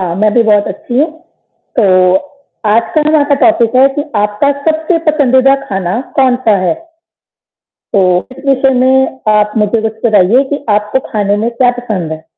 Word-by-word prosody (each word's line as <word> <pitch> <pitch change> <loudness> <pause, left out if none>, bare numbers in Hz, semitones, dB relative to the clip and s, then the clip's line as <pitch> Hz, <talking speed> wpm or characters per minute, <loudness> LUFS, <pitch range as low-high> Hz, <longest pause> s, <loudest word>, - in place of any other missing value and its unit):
हाँ, 175 -2 -3
मैं 210 +1 +1
भी 235 - +4
बहुत 210 -2 +2
अच्छी 240 +5 -4
हूँ। 310 +3 +1 0.7
तो 185 -4 +3 0.5
आज 215 +2 +3
का 310 - +3
यहाँ 310 -2 +3
का 285 - +3
टॉपिक 235 -8 +2
है 265 +1 +6
कि 290 - 0
आपका 210 +6 0 0.2
सबसे 320 +2 -1
पसंदीदा 270 -2 +3
खाना 190 +3 -2 0.2
कौन-सा 250 -5 +2
है? - - +1 1.2
तो 185 -2 +1
इस 275 - -13
विषय 270 0 +2
में 265 +1 +1 0.2
आप 210 0 +1
मुझे 215 +1 0
कुछ 220 0 -4
बताइए 215 +4 +3
कि 285 0 -4
आपको 210 +4 0
खाने 205 -2 0
में 225 +3 -1
क्या 245 +1 +1
पसंद 195 -10 -4
है? 160 0 -7
230 Hz, 170 wpm, -11 LUFS, 205-265 Hz, 1.2 s, है